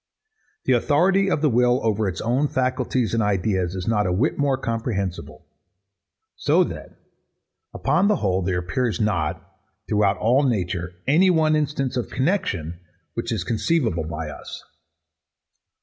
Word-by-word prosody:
The 130 - +3
authority 180 +10 +3
of 155 -4 0
the 150 - +4
will 125 +1 +3
over 110 -1 +1
its 95 - -5
own 130 +6 +1
faculties 130 -2 -1
and 115 - +2
ideas 95 -3 0
is 90 -1 -5
not 105 -3 +1
a - - 0
whit 110 - +1
more 140 -2 +1
comprehensible: 115 -7 -4 0.9
So - - +3
that, - - -8 0.7
upon 190 +4 +1
the 210 - +3
whole, 95 - 0
there 90 0 -1
appears 110 +3 -1
not, 90 -8 0 0.5
throughout 105 -2 +2
all 125 +6 +3
nature, 90 - -1
any 170 +8 +4
one 160 -3 +3
instance 140 -4 -1
of 125 - -2
connexion 100 - -1 0.3
which - - -4
is - - -1
conceivable 115 - 0
by 80 -1 -5
us. 70 - -9
115 Hz, 145 wpm, -23 LUFS, 95-140 Hz, 0.9 s, the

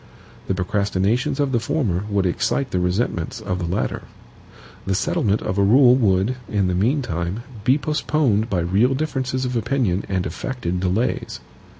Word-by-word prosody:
The 95 - 0
procrastinations 100 +8 0
of 140 -2 +1
the 120 - +2
former 110 - -1
would 100 -2 +1
excite 130 +9 0
the 90 - 0
resentments 90 -1 -1
of 90 0 -3
the 85 - -2
latter. 85 +3 -2 0.9
The 95 - +1
settlement 105 +1 0
of 95 - -2
a - - +4
rule 125 +4 +6
would, 105 0 +2
in 100 -2 +1
the 90 - 0
meantime, 100 - -1 0.2
be 130 +3 +4
postponed 145 -7 0
by 90 -4 0
real 100 +10 +2
differences 130 -3 -2
of 125 0 -2
opinion 115 -6 0
and 95 -2 -1
affected 90 - -3
delays. 95 +6 -1
105 Hz, 160 wpm, -22 LUFS, 95-130 Hz, 0.9 s, rule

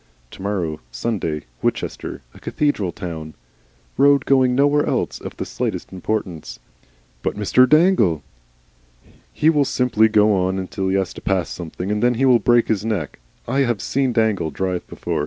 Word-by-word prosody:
To - - -12
morrow 90 -6 -2
Sunday, 80 - -3 0.2
Winchester - - -3
a - - -15
cathedral 125 - -1
town, 80 -5 -7 0.6
road 140 -1 +4
going 130 -2 +3
nowhere 145 +2 +3
else - - -2
of - - -8
the - - -3
slightest - - -4
importance. 95 -3 -4 0.6
"But - - -2
Mr. 125 +5 +3
Dangle?" 155 - +4 1.1
"He 155 +2 +3
will 150 -3 +3
simply 125 -5 +2
go 105 -1 +4
on 95 0 0
until 95 0 -3
he 95 - +1
has 95 -3 -1
to - - -10
pass 95 -3 0
something, 90 +3 -5
and 105 0 -1
then 120 0 +3
he 135 +4 +1
will 125 -3 +5
break 120 0 +3
his 105 -2 0
neck. 100 - -3 0.3
I 135 +3 0
have 120 -6 +1
seen 135 +5 0
Dangle 110 -8 +1
drive 90 +3 -3
before. - - -3
105 Hz, 165 wpm, -21 LUFS, 90-125 Hz, 1.1 s, will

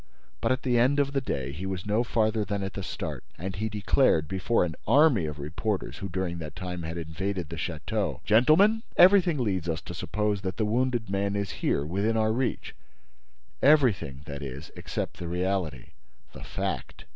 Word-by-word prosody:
But - - +1
at 130 +1 0
the 125 -2 +2
end 130 +4 +4
of 140 -1 +2
the 135 - +1
day 70 - -3
he 85 +7 -5
was 95 -2 -4
no 105 +3 +2
farther 110 -2 +1
than 100 0 -2
at 95 -2 -4
the - - -5
start; - - -5
and 95 +2 -5
he 110 +3 -2
declared, 105 - +2
before 95 +4 +1
an 85 - -4
army 140 - +5
of 75 -1 -5
reporters 80 +8 -3
who, 100 - -5
during 90 -1 -2
that 75 -1 -7
time, 90 -1 -5
had 80 +1 -5
invaded 85 +2 -3
the - - -5
château: 85 - -3
"Gentlemen, 155 - +5 0.2
everything 180 -3 +6
leads 95 -9 -1
us 80 0 -1
to - - -8
suppose 105 -1 -1
that 95 -2 -4
the 110 - +1
wounded 120 -1 0
man 100 0 0
is 100 -2 -2
here, 70 - +1
within 100 +7 0
our 110 0 +2
reach; 125 +2 -2 0.9
everything, 120 - +3
that 70 0 -6
is, 70 +2 -7
except - - -4
the 85 - -5
reality, 90 -6 -2 0.4
the - - -10
fact. - - -4
100 Hz, 190 wpm, -27 LUFS, 85-115 Hz, 0.9 s, everything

